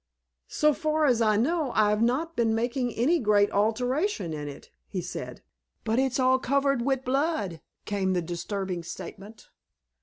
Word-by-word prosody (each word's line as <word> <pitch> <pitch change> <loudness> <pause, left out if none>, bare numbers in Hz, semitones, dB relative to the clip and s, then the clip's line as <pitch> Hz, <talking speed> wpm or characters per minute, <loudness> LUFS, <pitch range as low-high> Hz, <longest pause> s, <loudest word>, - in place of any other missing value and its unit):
"So 300 0 +2
far 310 +1 0
as 245 -4 +3
I 215 -2 +3
know, 290 +3 0
I've 210 0 +3
not 275 +8 0
been 225 -2 +2
making 245 +2 -1
any 305 +9 +2
great 205 -3 +3
alteration 230 - 0
in 150 -1 -5
it," 140 - -10 0.2
he - - -4
said. - - -6 0.4
"But 225 +3 +1
it's 265 0 +1
all 260 0 +4
covered 275 0 +1
wi' 270 +2 +2
blood," 260 - -1 0.2
came 195 -2 0
the 180 - +1
disturbing 180 +1 -4
statement. 200 +5 -10
235 Hz, 155 wpm, -27 LUFS, 205-275 Hz, 0.4 s, all